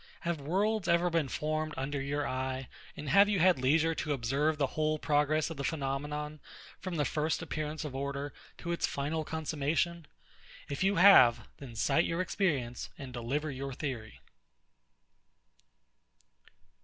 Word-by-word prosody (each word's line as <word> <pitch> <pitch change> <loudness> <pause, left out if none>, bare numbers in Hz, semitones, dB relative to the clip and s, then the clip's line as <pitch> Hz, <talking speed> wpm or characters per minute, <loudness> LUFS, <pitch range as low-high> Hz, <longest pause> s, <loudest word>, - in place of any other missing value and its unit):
Have 170 -3 -2
worlds 195 +6 0
ever 170 +1 +3
been 165 -4 +1
formed 155 +1 -2
under 135 +1 -2
your 145 +1 -1
eye; 130 0 -3 0.3
and 150 - -6
have 200 +6 +6
you 205 - +2
had 180 -4 +4
leisure 160 +5 +3
to 150 -2 -2
observe 140 +5 0
the 145 - +2
whole 155 0 +1
progress 150 +1 +1
of 165 - -7
the 140 - -3
phenomenon, 150 +1 -3 0.4
from 185 -2 -5
the 150 -2 +1
first 155 +3 -1
appearance 155 -1 -4
of 145 - -5
order 140 +1 -3 0.2
to 170 - -4
its 170 - 0
final 150 +3 -2
consummation? 160 +2 -1 0.6
If 140 +4 -2
you 195 +1 +3
have, 125 - +7
then 125 -5 -10
cite 160 +9 +2
your 165 - -2
experience, 135 - -1
and 135 -3 -8
deliver 135 +6 -2
your 135 0 -5
theory. 125 -5 -5
150 Hz, 150 wpm, -31 LUFS, 135-165 Hz, 0.6 s, have